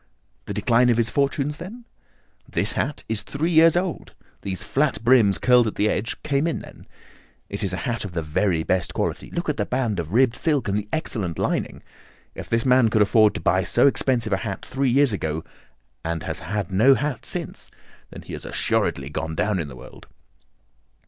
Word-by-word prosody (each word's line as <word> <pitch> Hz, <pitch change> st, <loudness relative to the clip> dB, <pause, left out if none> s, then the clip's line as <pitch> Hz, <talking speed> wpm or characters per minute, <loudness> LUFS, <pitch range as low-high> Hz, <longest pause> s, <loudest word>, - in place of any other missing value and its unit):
"The -, -, -5 dB
decline 120 Hz, +1 st, +3 dB
of 120 Hz, -, +3 dB
his 115 Hz, -2 st, +2 dB
fortunes, 140 Hz, +3 st, 0 dB
then?" 230 Hz, +8 st, -9 dB, 0.6 s
"This -, -, 0 dB
hat 150 Hz, -, -2 dB
is 110 Hz, -1 st, -1 dB
three 160 Hz, +5 st, -2 dB
years 165 Hz, +1 st, +6 dB
old. 180 Hz, -2 st, -3 dB, 0.3 s
These 95 Hz, -2 st, -4 dB
flat 140 Hz, -4 st, 0 dB
brims 115 Hz, -6 st, +5 dB
curled 125 Hz, +6 st, +4 dB
at 110 Hz, -, -4 dB
the 105 Hz, +1 st, +1 dB
edge 110 Hz, +2 st, -2 dB
came 140 Hz, +2 st, +1 dB
in 165 Hz, -, -1 dB
then. -, -, -12 dB, 0.6 s
It 100 Hz, -, -5 dB
is 95 Hz, -, -1 dB
a 90 Hz, -, -3 dB
hat 120 Hz, -1 st, -2 dB
of 100 Hz, -3 st, -7 dB
the 85 Hz, -1 st, -2 dB
very 80 Hz, +2 st, 0 dB
best 90 Hz, +1 st, -1 dB
quality. -, -, -2 dB
Look 170 Hz, -, -4 dB
at 150 Hz, -, -1 dB
the -, -, 0 dB
band 120 Hz, -7 st, -1 dB
of 80 Hz, -1 st, -4 dB
ribbed 125 Hz, +2 st, +3 dB
silk 145 Hz, -7 st, 0 dB
and 100 Hz, -, 0 dB
the 105 Hz, 0 st, -3 dB
excellent 100 Hz, -, -2 dB
lining. -, -, -2 dB, 0.5 s
If -, -, -9 dB
this 115 Hz, +2 st, +1 dB
man 125 Hz, -3 st, +5 dB
could 110 Hz, -1 st, +4 dB
afford 105 Hz, 0 st, +4 dB
to -, -, -4 dB
buy 95 Hz, -1 st, +2 dB
so 120 Hz, -, +2 dB
expensive 125 Hz, -5 st, +2 dB
a -, -, +2 dB
hat 100 Hz, -1 st, -5 dB
three 135 Hz, 0 st, 0 dB
years 135 Hz, -1 st, +3 dB
ago, 80 Hz, -4 st, -3 dB, 0.6 s
and 80 Hz, -1 st, -3 dB
has -, -, -4 dB
had 100 Hz, +4 st, -4 dB
no 120 Hz, +9 st, +5 dB
hat 140 Hz, 0 st, -3 dB
since, -, -, -5 dB, 0.4 s
then -, -, -10 dB
he -, -, -9 dB
has -, -, -6 dB
assuredly 70 Hz, +1 st, -1 dB
gone 80 Hz, +1 st, -4 dB
down 105 Hz, +2 st, 0 dB
in 80 Hz, -, -3 dB
the 70 Hz, -, -10 dB
world." 65 Hz, +1 st, -13 dB
115 Hz, 200 wpm, -23 LUFS, 95-135 Hz, 0.6 s, years